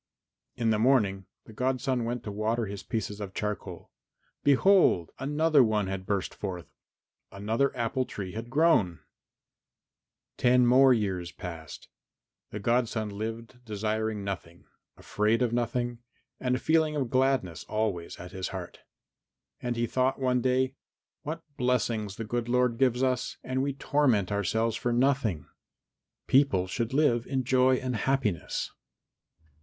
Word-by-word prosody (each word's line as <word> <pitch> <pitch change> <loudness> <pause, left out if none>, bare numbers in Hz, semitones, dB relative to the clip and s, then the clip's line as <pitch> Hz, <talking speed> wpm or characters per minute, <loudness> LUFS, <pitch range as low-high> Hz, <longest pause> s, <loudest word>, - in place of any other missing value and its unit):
In 115 -2 +1
the 105 - +1
morning 105 -6 +2 0.2
the 110 - -13
godson 130 +1 0
went 120 0 -3
to 105 - -5
water 110 +3 -1
his 100 -1 -6
pieces 105 -2 -4
of 95 -2 -6
charcoal. 100 -4 -5 0.5
Behold! 145 - +4
another 150 +1 +3
one 110 -3 +1
had 95 0 -5
burst 100 -2 -1
forth, 90 -4 -6 0.6
another 110 +7 0
apple 120 +2 0
tree 95 -6 -6
had 115 +3 -6
grown! 140 - +3
XIII 80 - -24 1.3
Ten 125 0 +4
more 130 +2 +6
years 95 -7 0
passed. 85 -4 -8 0.6
The 105 - -6
godson 115 -1 0
lived 115 +4 -6
desiring 110 -1 -2
nothing, 85 -3 -6 0.3
afraid 110 +3 +1
of 120 -1 0
nothing, 120 0 -1 0.4
and 125 -1 0
a - - -2
feeling 160 -1 +2
of 135 -5 -2
gladness 130 -10 +1
always 105 -6 -2
at 90 +1 -9
his 95 -1 -4
heart. - - -7 0.8
And 120 -1 -2
he 120 0 0
thought 130 +3 +1
one 125 -1 +1
day, 130 +1 +1 0.5
"What 165 +3 -5
blessings 115 -5 0
the 115 - -5
good 120 +2 -2
Lord 125 -1 +2
gives 130 -1 +2
us! 130 -1 0
And 130 +1 -1
we 140 0 -1
torment 130 -8 +1
ourselves 110 +3 0
for 120 - -1
nothing. 120 - +1 0.8
People 130 -9 +3
should 115 +5 -3
live 130 -5 +2
in 130 -1 -1
joy 130 +1 +4
and 125 -1 -2
happiness." 110 -5 -1
115 Hz, 140 wpm, -28 LUFS, 105-130 Hz, 1.3 s, more